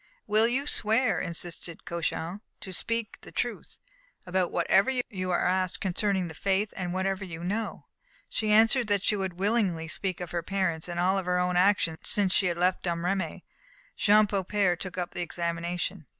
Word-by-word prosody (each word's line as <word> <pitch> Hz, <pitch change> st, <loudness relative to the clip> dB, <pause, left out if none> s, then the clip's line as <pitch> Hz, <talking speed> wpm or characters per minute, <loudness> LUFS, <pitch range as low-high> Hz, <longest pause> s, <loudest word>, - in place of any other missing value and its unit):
"Will 215 Hz, +2 st, +4 dB
you 260 Hz, +4 st, 0 dB
swear," 225 Hz, -2 st, +3 dB
insisted 170 Hz, 0 st, -3 dB
Cauchon, 170 Hz, +2 st, -3 dB, 0.2 s
"to 190 Hz, -, -6 dB
speak 230 Hz, +3 st, -2 dB
the -, -, -12 dB
truth -, -, -3 dB, 0.5 s
about 180 Hz, 0 st, 0 dB
whatever 190 Hz, +6 st, +3 dB, 0.2 s
you 185 Hz, -2 st, -3 dB
are 180 Hz, -, +2 dB
asked 185 Hz, 0 st, +1 dB
concerning 190 Hz, 0 st, 0 dB
the 160 Hz, -, -8 dB
faith, 195 Hz, +5 st, 0 dB
and 180 Hz, -2 st, -3 dB
whatever 190 Hz, +1 st, -1 dB
you 170 Hz, -2 st, -7 dB
know?" 210 Hz, +5 st, -3 dB, 0.4 s
She 215 Hz, -1 st, -1 dB
answered 225 Hz, +3 st, +5 dB
that 205 Hz, -2 st, +1 dB
she 210 Hz, -, +2 dB
would 190 Hz, -2 st, -2 dB
willingly 190 Hz, -4 st, 0 dB
speak 185 Hz, +3 st, -3 dB
of 180 Hz, -2 st, -6 dB
her 175 Hz, -, -1 dB
parents, 175 Hz, -3 st, -1 dB
and 175 Hz, -1 st, -4 dB
of 175 Hz, -, +2 dB
all 190 Hz, +1 st, +2 dB
her 180 Hz, 0 st, 0 dB
own 180 Hz, 0 st, +1 dB
actions 180 Hz, -3 st, +3 dB
since 195 Hz, -3 st, +2 dB
she 190 Hz, -, +4 dB
had 170 Hz, -1 st, -1 dB
left 180 Hz, +1 st, +1 dB
Domremy. 175 Hz, +2 st, -2 dB, 0.5 s
Jean 210 Hz, +1 st, +5 dB
Beaupère 200 Hz, -2 st, +1 dB
took 185 Hz, -1 st, -6 dB
up 175 Hz, -1 st, -2 dB
the -, -, -3 dB
examination. 170 Hz, 0 st, -3 dB
185 Hz, 180 wpm, -28 LUFS, 175-205 Hz, 0.5 s, answered